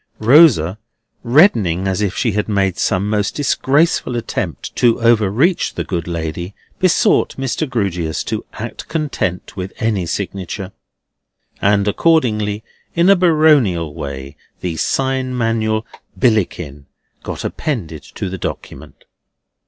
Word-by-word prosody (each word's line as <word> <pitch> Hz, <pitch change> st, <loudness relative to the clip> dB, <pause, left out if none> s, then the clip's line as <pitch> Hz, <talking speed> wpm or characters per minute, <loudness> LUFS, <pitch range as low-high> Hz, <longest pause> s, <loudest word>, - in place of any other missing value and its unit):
Rosa 110 Hz, -, +5 dB, 0.4 s
reddening 115 Hz, -, +3 dB
as 95 Hz, +1 st, -1 dB
if 100 Hz, -2 st, -1 dB
she 120 Hz, -, +1 dB
had 105 Hz, +1 st, -2 dB
made 95 Hz, -3 st, 0 dB
some 95 Hz, +2 st, +1 dB
most 105 Hz, 0 st, -1 dB
disgraceful 145 Hz, -1 st, +1 dB
attempt 120 Hz, -, -4 dB
to 120 Hz, -2 st, +3 dB
overreach 115 Hz, -, +2 dB
the -, -, -2 dB
good 85 Hz, -3 st, -4 dB
lady, 85 Hz, +2 st, -4 dB, 0.2 s
besought 185 Hz, -3 st, +3 dB
Mr. 135 Hz, +3 st, -2 dB
Grewgious 90 Hz, -9 st, -2 dB
to -, -, -3 dB, 0.2 s
rest -, -, -6 dB
content 145 Hz, -, -3 dB
with 95 Hz, 0 st, -5 dB
any 105 Hz, -6 st, -1 dB
signature. 95 Hz, +1 st, -4 dB, 0.9 s
And 100 Hz, 0 st, +2 dB
accordingly, 105 Hz, -6 st, +1 dB, 0.3 s
in 175 Hz, +3 st, +5 dB
a -, -, +7 dB
baronial 150 Hz, -, +3 dB
way, 70 Hz, 0 st, -7 dB, 0.2 s
the 90 Hz, -3 st, -3 dB
sign 130 Hz, +5 st, -1 dB
manual 110 Hz, -1 st, 0 dB, 0.3 s
BILLICKIN 90 Hz, -, 0 dB, 0.3 s
got -, -, -6 dB
appended 90 Hz, -, -3 dB
to -, -, -6 dB
the 95 Hz, 0 st, -5 dB
document. -, -, -7 dB
105 Hz, 120 wpm, -18 LUFS, 90-130 Hz, 0.9 s, a